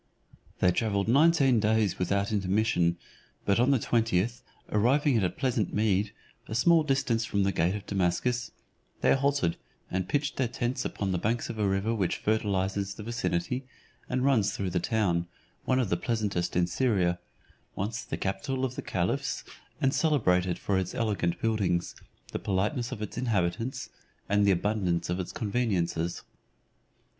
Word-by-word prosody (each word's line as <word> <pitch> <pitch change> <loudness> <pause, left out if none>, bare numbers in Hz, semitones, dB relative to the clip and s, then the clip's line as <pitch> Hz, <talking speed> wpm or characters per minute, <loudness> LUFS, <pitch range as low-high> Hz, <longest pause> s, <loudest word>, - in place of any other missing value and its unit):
They 90 - +5
travelled 100 0 0
nineteen 140 -1 +5
days 105 -3 +1
without 100 +2 0
intermission; 95 -3 +1 0.5
but 100 +2 +2
on 125 +3 +4
the 140 - +5
twentieth, 115 0 0 0.3
arriving 130 +6 +3
at 110 - +2
a 90 - +2
pleasant 125 -5 -1
mead, 105 -1 +1 0.4
a 110 - -4
small 165 +7 +5
distance 135 -5 +1
from 100 -3 0
the 100 - +2
gate 90 +2 +1
of 105 - -6
Damascus, 100 +6 0 0.5
they - - +5
halted, 135 -11 +1 0.3
and 95 0 -2
pitched 145 0 0
their 130 - +1
tents 120 +1 -2
upon 100 -2 -2
the 90 - 0
banks 115 +5 -1
of 110 - -8
a 105 - +2
river 95 +4 0
which 100 -6 0
fertilizes 100 -2 0
the 105 - -8
vicinity, 125 +3 -2 0.4
and 130 0 0
runs 115 -8 +3
through 95 -2 -2
the 90 - +1
town, 90 -5 0 0.4
one 130 - +2
of 125 -6 +1
the 85 - +1
pleasantest 105 -5 -1
in 90 0 +3
Syria, 90 -2 +1 0.6
once 110 +4 -3
the - - -4
capital 130 +8 -2
of 130 - -3
the - - -5
caliphs; - - -1 0.4
and 135 0 +2
celebrated 90 - +2
for 95 -2 0
its 95 -1 -4
elegant 100 -7 0
buildings, 100 -6 0 0.4
the - - -3
politeness 105 +6 -1
of 105 - -4
its 105 - -5
inhabitants, 115 +1 -1 0.4
and 100 0 +3
the - - +6
abundance 90 -3 0
of 90 - -1
its 90 - -4
conveniences. 100 -7 -1
105 Hz, 160 wpm, -28 LUFS, 95-120 Hz, 0.6 s, the